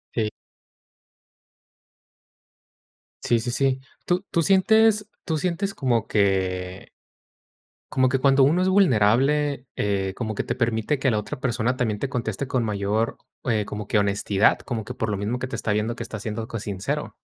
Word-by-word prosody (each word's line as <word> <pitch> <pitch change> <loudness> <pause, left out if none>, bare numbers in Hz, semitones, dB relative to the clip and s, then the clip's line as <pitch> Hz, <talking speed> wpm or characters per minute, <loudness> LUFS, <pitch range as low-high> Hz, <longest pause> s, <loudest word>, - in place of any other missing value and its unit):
Sí. 110 -2 +1 3.0
Sí, 120 -1 +3
sí, 120 +2 -3
sí. 135 +1 +1 0.3
¿Tú 180 +2 0
tú 170 - +2
sientes 210 +3 +4 0.2
tú 160 -2 -1
sientes 185 +4 -1
como 120 -5 0
que 95 -2 0 1.0
como 130 -1 +2
que 130 0 0
cuando 135 0 +5
uno 165 +7 +3
es 185 - +2
vulnerable, 140 - +3
eh, 95 -2 -1
como 110 -3 -3
que - - -1
te - - -2
permite 115 +4 0
que 135 - +2
la 110 - +1
otra 105 +4 -6
persona 125 0 0
también 110 -5 -1
te 135 +5 -2
conteste 120 0 -3
con 130 -2 0
mayor, 105 +2 -1 0.3
eh, 110 -4 +1
como 105 0 -6
que 105 - +2
honestidad, 100 0 +2
como 115 -5 -4
que - - -7
por 110 - -2
lo 105 - -1
mismo 105 +5 -2
que 130 - -3
te - - -4
está 105 - -1
viendo 105 +3 -1
que 115 - -5
estás 115 -4 -7
siendo 110 0 -4
co 115 - -5
sincero? 100 -2 -4
115 Hz, 170 wpm, -24 LUFS, 105-135 Hz, 3.0 s, cuando